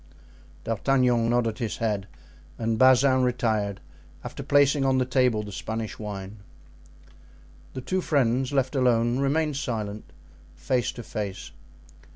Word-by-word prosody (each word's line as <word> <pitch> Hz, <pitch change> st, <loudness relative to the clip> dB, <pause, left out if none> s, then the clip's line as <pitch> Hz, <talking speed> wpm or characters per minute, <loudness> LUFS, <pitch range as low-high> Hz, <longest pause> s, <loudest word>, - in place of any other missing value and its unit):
D'Artagnan 120 Hz, 0 st, +1 dB
nodded 120 Hz, -1 st, 0 dB
his 115 Hz, -4 st, -3 dB
head 105 Hz, -4 st, -2 dB, 0.5 s
and 115 Hz, -1 st, -1 dB
Bazin 130 Hz, 0 st, +5 dB
retired, 110 Hz, -5 st, 0 dB, 0.4 s
after -, -, -7 dB
placing 145 Hz, 0 st, +3 dB
on 135 Hz, -1 st, +2 dB
the 130 Hz, -, +2 dB
table 125 Hz, -4 st, +1 dB
the 105 Hz, -, -8 dB
Spanish 110 Hz, +3 st, -5 dB
wine. 100 Hz, -1 st, -7 dB, 1.4 s
The 130 Hz, -, -4 dB
two 185 Hz, +8 st, -1 dB
friends, 130 Hz, -4 st, +1 dB
left 135 Hz, -2 st, 0 dB
alone, 120 Hz, -1 st, +2 dB
remained 150 Hz, +1 st, 0 dB
silent, 110 Hz, -6 st, -4 dB, 0.4 s
face 125 Hz, -3 st, -1 dB
to 120 Hz, -, -8 dB
face. 100 Hz, -3 st, -5 dB
120 Hz, 125 wpm, -26 LUFS, 110-130 Hz, 1.4 s, Bazin